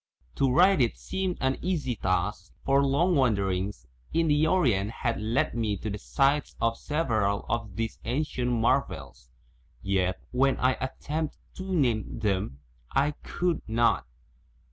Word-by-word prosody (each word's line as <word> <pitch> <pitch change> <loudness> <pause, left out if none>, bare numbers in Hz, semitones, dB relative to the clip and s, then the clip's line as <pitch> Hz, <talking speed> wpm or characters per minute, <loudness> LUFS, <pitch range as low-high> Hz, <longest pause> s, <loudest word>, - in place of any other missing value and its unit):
To 135 - +3
write 180 +3 +5
it 120 - +1
seemed 190 -2 -3
an 130 0 +1
easy 160 -9 -1
task, 90 0 -1
for 135 +1 +4
long 145 +7 +2
wanderings 100 - 0 0.3
in 165 -1 +2
the 150 +1 +3
Orient 120 - +2
had 115 -1 -2
led 110 +4 0
me 110 -3 -1
to 105 +3 -4
the 105 - -4
sites 140 +6 +1
of 115 0 +1
several 110 -10 0
of 115 -5 -2
these 115 +1 -3
ancient 125 -1 -1
marvels, 115 - -1 0.5
yet 95 -1 0
when 135 +2 +2
I 130 - +3
attempted 150 +4 -3 0.2
to 190 0 -5
name 125 - +1
them, 100 -9 -1 0.3
I 145 +2 +2
could 175 -1 -1
not. 115 - +2
120 Hz, 145 wpm, -28 LUFS, 105-150 Hz, 0.5 s, write